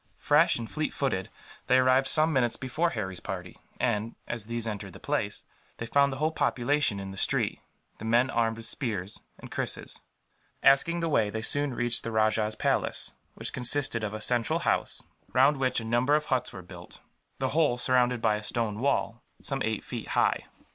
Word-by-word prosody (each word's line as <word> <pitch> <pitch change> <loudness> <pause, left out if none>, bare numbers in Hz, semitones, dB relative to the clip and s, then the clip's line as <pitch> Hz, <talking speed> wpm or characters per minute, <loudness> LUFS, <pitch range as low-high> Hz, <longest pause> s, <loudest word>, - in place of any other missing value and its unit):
Fresh - - +4
and 115 -1 -5
fleet 155 +4 -3
footed, 110 -10 -1 0.4
they 130 0 +5
arrived 130 +1 +4
some 155 +1 +3
minutes 120 -4 +2
before 155 +6 -1
Harry's 95 - -4
party 90 -3 -6 0.2
and, 105 +2 -1
as 115 -3 -2
these 115 -1 0
entered 105 -3 -5
the - - -11
place, - - -2 0.3
they 115 - -4
found 140 +4 +3
the 135 - -5
whole 155 +3 +1
population 135 -6 +1
in 95 0 -6
the 95 - -10
street, - - +1 0.4
the 110 - -7
men 120 +3 +3
armed 115 -1 +1
with 115 - -7
spears 105 -6 -2 0.2
and - - -12
krises. - - -3 0.6
Asking 165 +5 +4
the 165 - 0
way, 115 -9 +2
they 110 +1 -4
soon 145 0 0
reached 120 -1 0
the 115 - -4
rajah's 110 0 +1
palace, - - -1 0.2
which - - -4
consisted 125 -2 +1
of 105 0 -3
a 110 - -6
central 120 +1 +1
house, - - 0 0.3
round 135 +3 +5
which 130 -2 +1
a 115 - -7
number 120 +5 +2
of 150 0 0
huts 130 -3 -1
were 95 - -9
built; 90 -1 -12 0.4
the - - -1
whole 150 -5 +2
surrounded 125 -1 +3
by 110 -2 +3
a - - -7
stone 110 -1 -2
wall, 125 -3 0 0.2
some 135 -1 -3
eight 110 -2 -2
feet - - -6
high. - - +1
120 Hz, 190 wpm, -28 LUFS, 110-135 Hz, 0.6 s, they